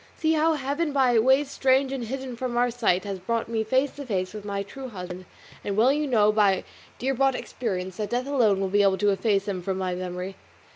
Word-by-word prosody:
See 315 0 +2
how 320 +1 +3
Heaven, 290 +2 -2
by 255 -4 +4
ways 265 +4 +3
strange 265 0 +2
and 265 -3 -3
hidden 260 +1 -5
from 240 0 -3
our 245 0 +2
sight, 215 -6 +1
has 195 -2 -5
brought 230 +5 -2
me 225 -1 -1
face 260 +5 +1
to 285 - -5
face 185 -4 -2
with 210 -1 -7
my 200 -1 -3
true 260 +6 -8
husband; 180 -3 -8 0.4
and 200 0 -3
well 245 +5 +5
you 300 0 -1
know 215 -5 +4
by 205 -3 +3 0.3
dear 265 +2 -1
bought 270 0 +2
experience 190 -9 -4
that 210 -1 -3
death 245 +1 -1
alone 235 -9 +2
will 195 - 0
be 205 +2 +3
able 195 -1 +3
to 205 +2 +2
efface 200 0 +1
him 190 -3 -2
from 190 +1 -2
my 185 -1 -2
memory. 180 +1 -5
225 Hz, 230 wpm, -25 LUFS, 195-265 Hz, 0.4 s, well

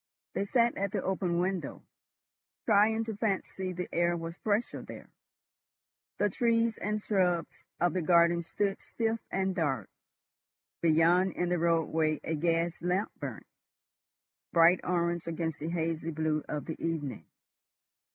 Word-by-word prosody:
They 200 - -1
sat 235 +2 +2
at 200 0 -1
the - - -2
open 185 -2 0
window, 185 +1 -2 0.8
trying 220 +1 +4
to 220 -2 -5
fancy 190 -3 -2
the 180 0 -4
air 175 0 +2
was 165 0 -6
fresher 215 +2 -1
there. - - -11 1.1
The 205 - +3
trees 230 +2 +1
and 210 +1 -1
shrubs 180 -6 0
of 175 0 +2
the 185 - 0
garden 170 0 +4
stood 195 +4 -2
stiff 225 0 -2
and 190 0 0
dark; 135 - -1 0.9
beyond 170 +3 +4
in 175 0 -1
the 180 -1 +1
roadway 160 -2 +1
a 165 - -2
gas 165 +2 0
lamp 180 +4 0
burnt, - - -6 1.1
bright 170 +1 +6
orange 170 -1 0
against 160 -1 -3
the 155 - -3
hazy 165 -1 -2
blue 155 -1 -1
of 150 -1 -3
the 160 - -6
evening. 145 - -3
175 Hz, 140 wpm, -30 LUFS, 165-195 Hz, 1.1 s, bright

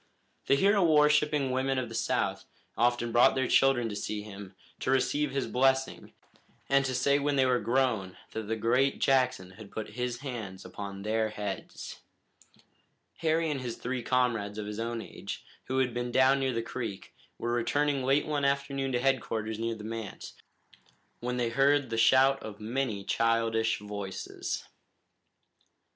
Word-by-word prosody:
The 140 - +5
hero 200 +6 +4
worshipping 150 -3 +3
women 130 +1 0
of 130 -2 -1
the 115 - -9
South 115 - -1 0.3
often 120 0 +1
brought 120 +1 +5
their 130 -1 +1
children 130 -3 +4
to 105 - -5
see 105 0 -3
him, 100 -2 -10 0.2
to - - -3
receive 145 +2 +2
his 135 0 -1
blessing, 130 +1 +1 0.5
and 140 0 +4
to 130 -1 -1
say 140 +3 +3
when 145 0 0
they 135 -1 +4
were 125 -1 +3
grown 115 -5 0
that 110 -2 -5
the 110 - 0
great 125 +5 +2
Jackson 130 -8 +2
had 100 +1 -12
put 110 +1 -6
his 125 0 -3
hands 110 -9 -6
upon 100 -1 -7
their 110 +1 0
heads. 105 -2 -6 1.2
Harry 160 0 +1
and 135 -3 -3
his 120 -2 -4
three 125 0 -3
comrades 115 -5 0
of 105 - -4
his 105 +1 -5
own 115 0 -3
age, - - -8 0.2
who 130 - -2
had 130 -2 +1
been 120 0 -3
down 130 +2 +4
near 135 -1 0
the 115 -1 -2
creek, 115 -5 -6 0.2
were 120 0 -2
returning 140 +4 +1
late 135 +3 +2
one 150 -2 -1
afternoon 140 -1 0
to 120 - +2
headquarters 115 -4 -1
near 115 0 -1
the 110 - -10
manse, 110 -2 -6 0.9
when 125 +1 -3
they 120 -2 0
heard 135 +1 +2
the - - 0
shout 130 +4 +5
of 105 -2 -8
many 110 -2 -2
childish 115 0 +1
voices. 100 -2 -5
125 Hz, 165 wpm, -29 LUFS, 110-135 Hz, 1.2 s, The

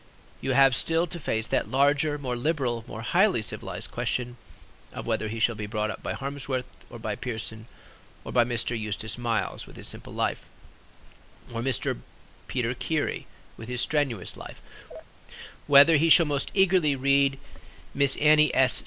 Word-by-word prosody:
You 135 - -1
have 135 -1 +5
still 165 +6 +1
to 170 0 -7
face 110 -7 -1
that - - -1
larger, 145 +3 +2
more 130 -4 -3
liberal, 125 -4 -1
more 110 - -7
highly 185 - +3
civilized - - -6
question, 125 -1 -2 0.6
of - - -6
whether 110 - -1
he 115 +1 -5
shall 120 +1 +3
be 105 -1 -6
brought 105 0 -2
up - - -9
by - - -3
Harmsworth 135 -2 -4 0.2
or 120 - -9
by 110 -2 -4
Pearson, 110 -1 -6 0.6
by 120 - +2
Mr. 120 0 -1
Eustace 110 -1 -3
Miles 115 -3 -2
with - - -14
his - - -4
Simple - - -7
Life - - -2 1.0
or 115 - -3
Mr. 130 -1 -1 0.5
Peter - - -1
Keary - - -2 0.3
with 115 - -9
his 125 0 0
Strenuous 135 - -1
Life; - - -11 1.0
whether 145 +3 +7
he 165 +3 +3
shall 170 +1 +7
most 145 -2 -1
eagerly 185 -7 +3
read 140 +1 +2 0.6
Miss 140 -1 +1
Annie 150 0 +5
S. 130 -1 +4
130 Hz, 160 wpm, -26 LUFS, 115-145 Hz, 1.0 s, whether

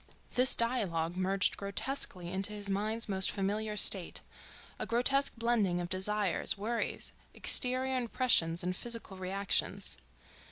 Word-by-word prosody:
This 255 +1 +4
dialogue 185 -9 -1
merged 190 +1 0
grotesquely 200 -3 -2
into 195 +3 -2
his 205 -1 -3
mind's 215 +4 -2
most 190 -2 +2
familiar 210 +2 -3
state—a - - +1
grotesque 275 +4 +1
blending 225 -6 0
of 175 0 -5
desires, 195 +1 +2
worries, 230 +4 -3 0.2
exterior 260 +1 +3
impressions 230 -9 +1
and 180 +1 -2
physical 230 -3 -4
reactions. 195 +1 -1
205 Hz, 115 wpm, -31 LUFS, 190-235 Hz, 0.2 s, This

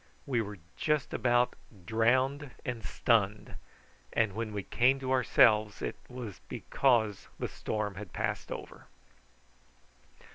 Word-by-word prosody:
We 125 -4 +1
were 105 -1 -6 0.2
just 150 -3 0
about 120 0 +3 0.3
drowned 130 - +2 0.2
and 120 -3 -3
stunned, 105 -2 +1 0.6
and 110 -3 +1
when 110 +1 -3
we 100 -1 -3
came 130 +6 +3
to 130 -1 -3
ourselves 110 -4 +4
it - - -2
was 125 -6 -7
because 115 -7 +1
the - - -2
storm 105 -2 -3
had 95 -2 -8
passed - - -3
over. - - -8
115 Hz, 120 wpm, -31 LUFS, 105-130 Hz, 0.6 s, ourselves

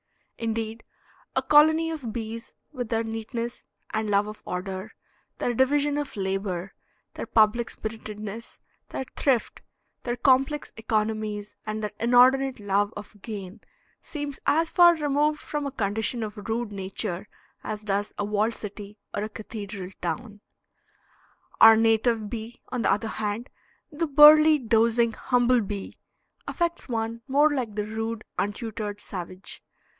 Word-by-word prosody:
Indeed, 225 0 -3 0.5
a - - +2
colony 315 +2 +5
of 275 -8 -5
bees, 230 0 -6 0.2
with 250 -6 -5
their 225 -1 +1
neatness 230 +2 -4 0.3
and 215 -1 -1
love 200 0 +3
of 215 0 -8
order, 190 +2 -4 0.5
their 245 - 0
division 285 +4 +2
of 290 -6 -5
labor, 190 -1 -2 0.4
their - - -6
public 225 +1 +3
spiritedness, 215 0 -7 0.3
their 265 - -4
thrift, 260 -5 +1 0.4
their 240 -1 -2
complex 270 +3 +2
economies 215 -2 -2
and 215 0 -3
their 210 - -2
inordinate 255 +2 +4
love 205 0 +1
of 205 0 -11
gain, 200 -2 -7 0.4
seems 290 -3 -6
as 320 +3 +3
far 345 -1 +7
removed 300 0 +1
from 295 -1 -3
a - - -4
condition 220 0 -1
of 210 0 -7
rude 225 -1 -1
nature 190 -1 -4 0.4
as 215 0 -5
does 205 0 -1
a 205 - -1
walled 210 +2 +1
city 205 0 -8 0.2
or 205 - -2
a 215 - -3
cathedral 205 -3 -7
town. 200 +5 -4 1.2
Our 225 0 +9
native 225 0 +2
bee, 230 +1 -7
on 250 -2 -2
the - - +3
other 210 +3 0
hand, 215 +3 -3 0.4
"the 325 +2 -1
burly, 305 +2 +8
dozing 230 -1 +3
humble 245 +1 +2
bee," 200 -1 -6 0.5
affects 340 -4 -2
one 230 0 -2
more 290 +3 +4
like 245 -7 -2
the 210 -1 -1
rude, 225 +1 -4 0.2
untutored 210 0 -3
savage. 185 -1 -6
225 Hz, 140 wpm, -26 LUFS, 210-255 Hz, 1.2 s, Our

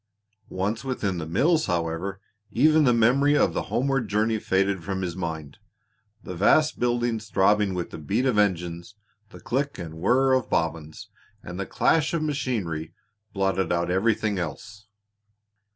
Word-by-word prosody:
Once 105 +6 -2
within 105 -9 -2
the 80 - -5
mills, 155 - +2
however, 85 +2 -2 0.3
even 155 +5 +4
the 125 - +5
memory 135 +6 +3
of - - +2
the - - -1
homeward 135 -2 0
journey 110 +2 0
faded 95 -2 0
from 95 +1 -3
his 85 -2 -3
mind. 80 -5 -5 0.6
The - - -7
vast 150 - +3
buildings 120 -2 -1
throbbing 100 -1 +2
with 90 -1 -4
the - - -8
beat 105 - -1
of 125 -5 +2
engines, 90 -1 -1 0.3
the - - -13
click 140 +3 -2
and 85 -3 -7
whirr 130 +8 +3
of 130 -1 +1
bobbins, 80 -2 -3 0.3
and 90 +1 -7
the 100 - -3
clash 160 0 +1
of 160 - -1
machinery, 110 - -3 0.4
blotted 95 -1 0
out 85 0 0
everything 105 +1 +1
else. 105 +6 -7
100 Hz, 150 wpm, -25 LUFS, 90-125 Hz, 0.6 s, the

